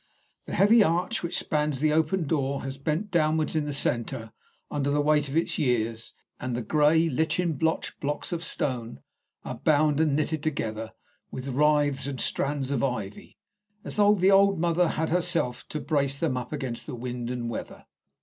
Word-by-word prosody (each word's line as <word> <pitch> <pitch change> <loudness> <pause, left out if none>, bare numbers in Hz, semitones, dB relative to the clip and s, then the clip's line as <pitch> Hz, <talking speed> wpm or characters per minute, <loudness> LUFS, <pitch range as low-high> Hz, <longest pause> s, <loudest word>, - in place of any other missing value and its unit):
The - - -5
heavy 215 +3 +6
arch 180 +6 0
which 170 0 -2
spans 150 -3 0
the 150 +1 +2
open 160 +4 +1
door 140 -2 -1
has 135 0 -6
bent 160 +8 -2
downwards 155 -2 +1
in 155 -1 +1
the 145 - -3
centre 120 -4 -1 0.4
under 145 -1 -1
the 145 +1 +1
weight 150 -1 +2
of 145 - -1
its 165 - 0
years, 115 -3 -1 0.3
and 125 -2 -3
the 120 - -3
grey, 155 +6 +3
lichen 160 +3 0
blotched 160 +3 -1
blocks 145 +1 -3
of 170 -1 -3
stone 120 - -3 0.4
are, - - -6
bound 150 -1 +3
and 155 -3 +2
knitted 155 0 -1
together 110 -7 -3 0.4
with 130 +1 -6
withes 145 0 +2
and 135 -2 -4
strands 140 -1 -1
of 140 -3 0
ivy, 110 -7 -4 0.5
as - - -5
though 205 0 +5
the 190 0 +4
old 195 0 +5
mother 170 +1 +2
had 160 0 -1
set 170 - +1
herself 170 -8 -1
to 155 - -3
brace 140 -3 0
them 155 -6 0
up 125 -1 -5
against 135 -6 -4
wind 120 0 -5
and 120 -2 -3
weather. - - -7
150 Hz, 180 wpm, -27 LUFS, 130-160 Hz, 0.5 s, heavy